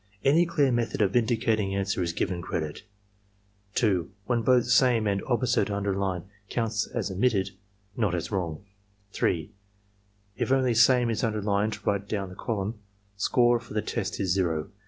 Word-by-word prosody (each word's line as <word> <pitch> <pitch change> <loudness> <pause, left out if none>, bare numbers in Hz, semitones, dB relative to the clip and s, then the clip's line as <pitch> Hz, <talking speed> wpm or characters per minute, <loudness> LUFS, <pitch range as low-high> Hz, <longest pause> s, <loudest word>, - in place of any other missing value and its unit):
Any 160 +5 +4
clear 150 -5 +2
method 120 -2 -1
of 100 -1 0
indicating 110 -4 +1
answer 100 -1 -1
is 85 -1 0
given 85 +1 -2
credit. 80 -4 -4 0.9
2. 95 -7 +1 0.2
When 120 0 +1
both 125 +1 +4
"Same 120 -1 +4
and 100 -1 0
"Opposite" 125 -3 +1
are 100 - -1
underlined, 95 -3 -1 0.3
counts 115 -3 -1
as - - -3
omittedf 100 -1 +1 0.5
not 105 -7 +1
as 85 - -4
wrong. 90 -2 -3 0.5
3. 80 -5 -1 0.9
If - - -1
only 130 -2 +3
"Same" 120 +1 +5
is 115 - -2
underlined 105 -1 -1
right 100 0 -1
down 100 -3 -2
the 90 - -11
column, 105 +1 -3 0.4
score 120 +4 +3
for 115 -2 -11
the 105 - 0
test 105 -1 -3
is 95 -3 0
zero. 85 -2 -1
105 Hz, 155 wpm, -27 LUFS, 95-120 Hz, 0.9 s, Same